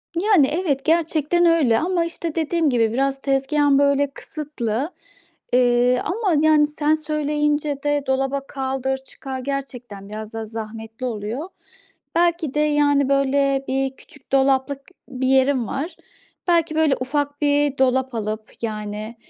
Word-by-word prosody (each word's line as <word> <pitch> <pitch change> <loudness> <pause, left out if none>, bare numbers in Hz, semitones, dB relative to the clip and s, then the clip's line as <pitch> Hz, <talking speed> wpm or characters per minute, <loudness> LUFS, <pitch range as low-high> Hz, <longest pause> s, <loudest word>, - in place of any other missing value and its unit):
Yani, 355 -5 +4
evet, 300 -4 -1
gerçekten 325 +1 +2
öyle 310 -9 +4
ama, 345 0 0
işte, 335 -1 -5
dediğim 325 -1 +1
gibi, 230 -3 +2
biraz 270 +2 0
tezgâhım, 275 +1 +2
böyle, 280 0 +3
kısıtlı, 280 -2 -4 0.6
eee, 245 0 +3
ama, 390 -3 0
yani, 310 -1 +5
sen 300 0 0
söyleyince 295 -1 -1
de 290 -1 +1
dolaba 270 +1 -1
kaldır, 265 -1 -2
çıkar 265 0 -8
gerçekten 250 -7 -6
biraz 215 +1 -7
da 225 0 -4
zahmetli 225 +1 -7
oluyor. 235 - -4 0.7
Belki 340 -4 +1
de, 300 - 0
yani, 290 -2 +3
böyle, 275 0 +2
bir 270 0 0
küçük 290 -4 -20
dolaplık 270 +1 +2 0.3
bir 260 -1 -2
yerim 265 -2 +3
var. 290 - -4 0.5
Belki, 335 -2 +2
böyle, 310 -3 +3
ufak 285 +2 -2
bir 290 -1 +2
dolap 260 -1 +1
alıp, 215 0 -4
yani, 215 0 -5
275 Hz, 135 wpm, -22 LUFS, 255-300 Hz, 0.7 s, yani